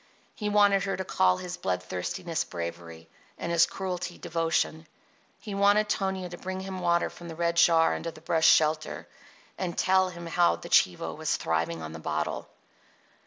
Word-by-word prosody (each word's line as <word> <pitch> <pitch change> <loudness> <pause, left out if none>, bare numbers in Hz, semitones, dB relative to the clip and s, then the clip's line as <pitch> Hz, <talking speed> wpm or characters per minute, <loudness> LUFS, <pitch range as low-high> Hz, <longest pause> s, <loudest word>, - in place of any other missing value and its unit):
He 210 -1 -3
wanted 205 -1 +4
her 195 - -2
to 190 - -4
call 90 - +2
his 180 0 -6
bloodthirstiness 90 - -3
bravery 85 -1 -7 0.3
and 170 - -4
his 170 0 +5
cruelty 180 -2 -4
devotion. 165 -1 -1 0.5
He 210 - -7
wanted 205 +1 +3
Tonia 190 -2 -1
to 175 - -9
bring 190 0 -5
him 190 -1 -6
water 170 -1 +2
from 175 - -11
the 165 - -7
red 170 0 0
jar 165 -1 +5
under 165 - -4
the 160 - -12
brush 160 0 +2
shelter, 155 0 +2 0.5
and 180 -3 -3
tell 190 0 +3
him 170 -1 -9
how 170 - +3
the 85 - -10
chivo - - +3
was - - -1
thriving 80 0 -1
on 80 - -6
the 80 - -7
bottle. 75 0 -3
170 Hz, 170 wpm, -28 LUFS, -, 0.5 s, his